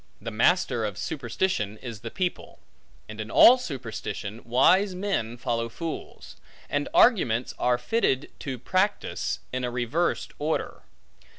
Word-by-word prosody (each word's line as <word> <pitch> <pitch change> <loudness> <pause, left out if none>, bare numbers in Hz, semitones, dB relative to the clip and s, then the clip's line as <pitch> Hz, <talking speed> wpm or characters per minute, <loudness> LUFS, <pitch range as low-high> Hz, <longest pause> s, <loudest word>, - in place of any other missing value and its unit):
The 115 +2 -6
master 120 0 +2
of 105 -3 -3
superstition, 120 - -2
is 115 -2 -8
the 115 - -6
people; 180 +7 -3 0.5
and 110 0 -7
in 110 - -6
all 255 +2 +8
superstition, 115 - -6
wise 180 - +3
men 180 - -2
follow 115 -1 -2
fools; 160 +8 -7 0.3
and 145 0 -1
arguments 210 - +3
are 125 0 +2
fitted 135 - 0
to 135 -3 -4
practice, 185 - -1
in 130 0 -2
a 125 - 0
reversed 125 +8 -1
order. 155 +2 -2
125 Hz, 130 wpm, -26 LUFS, 115-180 Hz, 0.5 s, all